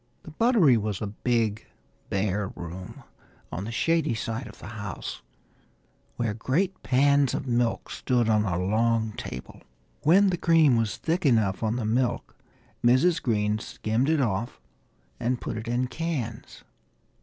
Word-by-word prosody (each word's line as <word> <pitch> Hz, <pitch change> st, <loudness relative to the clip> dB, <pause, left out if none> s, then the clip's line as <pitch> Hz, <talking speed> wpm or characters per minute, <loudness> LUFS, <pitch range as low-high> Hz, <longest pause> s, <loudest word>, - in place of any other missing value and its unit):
The 160 Hz, -, -10 dB
buttery 185 Hz, -, +4 dB
was 105 Hz, -2 st, -2 dB
a -, -, -3 dB
big 110 Hz, 0 st, -1 dB, 0.4 s
bare 100 Hz, 0 st, 0 dB
room 90 Hz, +2 st, -8 dB, 0.5 s
on 90 Hz, +5 st, -4 dB
the 115 Hz, -, -5 dB
shady 160 Hz, +1 st, +1 dB
side 115 Hz, +3 st, -4 dB
of -, -, -13 dB
the -, -, -12 dB
house, 105 Hz, -4 st, -6 dB, 0.9 s
where 115 Hz, -3 st, -1 dB
great 165 Hz, -, -1 dB
pans 140 Hz, +1 st, +3 dB
of -, -, -3 dB
milk 120 Hz, -2 st, 0 dB
stood 120 Hz, -3 st, 0 dB
on 105 Hz, -1 st, +3 dB
a 90 Hz, -5 st, -1 dB
long 110 Hz, +3 st, +1 dB
table. 65 Hz, -9 st, -8 dB, 0.4 s
When 190 Hz, +6 st, +5 dB
the 175 Hz, -, -1 dB
cream 165 Hz, -6 st, +4 dB
was 115 Hz, -3 st, 0 dB
thick 170 Hz, +3 st, -1 dB
enough 110 Hz, -, +2 dB
on 110 Hz, 0 st, 0 dB
the 120 Hz, -3 st, -2 dB
milk 120 Hz, +3 st, -1 dB, 0.5 s
Mrs. 130 Hz, +8 st, +4 dB
Green 105 Hz, -2 st, 0 dB
skimmed 110 Hz, +6 st, -1 dB
it 160 Hz, -2 st, +3 dB
off 115 Hz, -1 st, -2 dB, 0.6 s
and 120 Hz, +1 st, 0 dB
put -, -, -4 dB
it 110 Hz, +1 st, -6 dB
in 120 Hz, +2 st, 0 dB
cans. 130 Hz, -6 st, -5 dB
115 Hz, 150 wpm, -26 LUFS, 105-140 Hz, 0.9 s, When